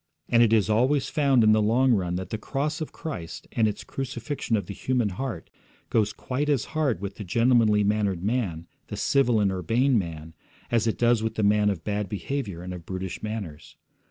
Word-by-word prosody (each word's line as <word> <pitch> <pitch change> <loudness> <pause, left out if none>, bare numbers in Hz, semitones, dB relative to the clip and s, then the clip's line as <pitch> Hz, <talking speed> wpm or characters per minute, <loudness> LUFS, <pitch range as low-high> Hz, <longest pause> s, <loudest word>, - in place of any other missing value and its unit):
And 115 - +5
it 115 -2 +5
is 110 -4 +4
always 125 +6 +2
found 140 -5 +3
in 110 - +6
the 110 0 +4
long 120 +4 +3
run 90 -4 0
that 95 0 -5
the 110 - -3
cross 150 +7 -2
of 155 - -4
Christ 140 - -7
and 110 -2 +2
its 105 - -4
crucifixion 125 -2 -3
of 100 - -3
the 100 - -6
human 125 -1 0
heart 100 -3 -5 0.4
goes 105 -2 +2
quite 140 +4 -3
as 140 -6 +1
hard 150 -9 0
with 100 -1 -5
the 105 - -5
gentlemanly 115 +1 +3
mannered 100 -3 0
man, 100 -7 -1 0.2
the - - -6
civil 125 -5 +2
and 100 -2 +2
urbane 115 - +2
man, 80 -3 -6 0.4
as 115 -1 +2
it 110 - 0
does 120 -1 +3
with 110 0 -2
the 110 - 0
man 105 0 +4
of 90 -5 -3
bad 105 -1 -2
behaviour 105 -4 -4
and 90 0 -5
of 90 -2 -8
brutish 95 0 -5
manners. 105 -9 -6
110 Hz, 205 wpm, -26 LUFS, 95-125 Hz, 0.4 s, in